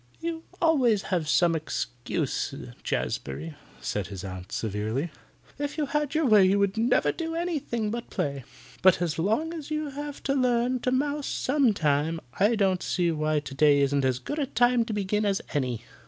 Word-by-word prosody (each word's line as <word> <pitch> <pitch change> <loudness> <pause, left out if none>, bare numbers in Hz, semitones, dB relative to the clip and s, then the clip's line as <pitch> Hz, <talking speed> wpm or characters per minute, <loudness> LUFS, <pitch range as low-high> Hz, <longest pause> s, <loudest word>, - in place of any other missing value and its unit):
"You 330 0 -4
always 255 - +3
have 170 -5 -1
some 170 +1 +4
excuse, 120 -6 -2 0.3
Jazbury," 70 +5 -3 0.3
said 90 +10 -2
his 95 -1 -7
aunt, 95 -1 -7
severely. 110 - -2 0.5
"If 290 +1 -3
you 300 - +1
had 295 +1 -1
your 315 0 +2
way 215 -5 +6
you 190 +2 +4
would 200 0 +1
never 230 +3 +3
do 325 -1 -4
anything 290 -11 -2
but 235 +1 -5
play. 140 -2 -2 0.4
But 185 -2 +6
as 165 -3 -1
long 225 - +1
as 310 -3 -7
you 305 -1 -2
have 290 +1 -6
to 275 - +1
learn 250 -1 +2
to 250 - -1
mouse 285 +2 0
some 270 -3 +2
time, 155 0 +1 0.2
I 210 +4 +4
don't 190 -3 +2
see 175 -2 +1
why 155 -1 0
today 145 +1 +3
isn't 140 0 +2
as 130 -2 +2
good 210 - -4
a 280 - 0
time 245 0 +3
to 225 - -4
begin 210 +1 0
as 200 -2 +1
any." 125 -5 -1
200 Hz, 180 wpm, -27 LUFS, -, 0.5 s, way